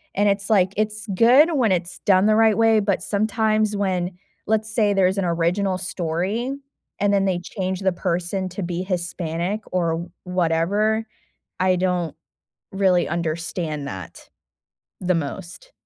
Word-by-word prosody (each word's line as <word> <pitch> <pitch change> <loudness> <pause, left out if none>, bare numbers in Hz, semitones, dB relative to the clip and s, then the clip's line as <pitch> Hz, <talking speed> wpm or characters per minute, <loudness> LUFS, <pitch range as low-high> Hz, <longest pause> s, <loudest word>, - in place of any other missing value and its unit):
And 205 +1 +3
it's, 200 +1 0
like, 195 -2 +3
it's 215 0 -2
good 260 - +6
when 240 -8 +2
it's 180 0 -2
done 190 -1 +3
the 215 0 +4
right 220 -2 +4
way, 225 -1 +4
but 200 -2 0
sometimes 215 0 +1
when 185 -2 -1 0.3
let's 220 0 0
say 210 -3 +3
there's 190 0 +2
an 195 - 0
original 180 +3 0
story 185 +8 -2 0.5
and 205 0 +2
then 195 -1 +2
they 185 -2 +1
change 185 +1 -4
the 190 - +2
person 180 +1 -2
to 185 +2 -5
be 175 +1 -3
Hispanic 175 +1 -2
or 170 -1 -1
whatever, 185 +5 +1 0.5
I 185 0 +3
don't 180 -3 -1 0.6
really 190 -2 +2
understand 165 -3 -3
that 95 -2 -9 0.7
the 180 -1 +1
most. 175 - -5
190 Hz, 145 wpm, -22 LUFS, 175-210 Hz, 0.7 s, good